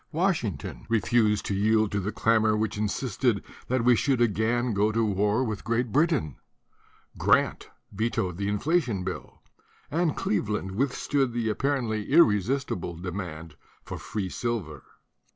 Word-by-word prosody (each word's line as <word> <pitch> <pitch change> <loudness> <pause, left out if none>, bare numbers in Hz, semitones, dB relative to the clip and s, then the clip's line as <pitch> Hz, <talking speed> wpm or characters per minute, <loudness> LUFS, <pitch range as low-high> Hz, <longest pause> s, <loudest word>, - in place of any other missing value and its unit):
Washington 155 - -2
refused 110 -2 +2
to - - -1
yield 110 +1 +2
to 100 - 0
the 100 +2 -2
clamor 110 -1 +2
which 110 0 -1
insisted 105 +1 0 0.2
that 130 -1 0
we 125 0 +5
should 135 +2 +1
again 120 +1 +1
go 105 +2 +2
to 115 +1 +1
war 105 +4 +1
with 110 -4 -4
Great 115 +1 -1
Britain; 145 - +1 0.8
Grant - - +2 0.2
vetoed 105 -4 -1
the 100 0 -2
in 105 0 0
flation 125 - 0
bill; 95 - -7 0.5
and 165 0 0
Cleveland 105 -2 -1
withstood 135 +3 0
the 115 -2 0
ap - - -5
parently 120 -7 -1
irresistible 110 - +2
demand 85 -3 -6 0.3
for - - -7
free 105 -3 -4
silver. 90 - -3
110 Hz, 140 wpm, -27 LUFS, 100-125 Hz, 0.8 s, we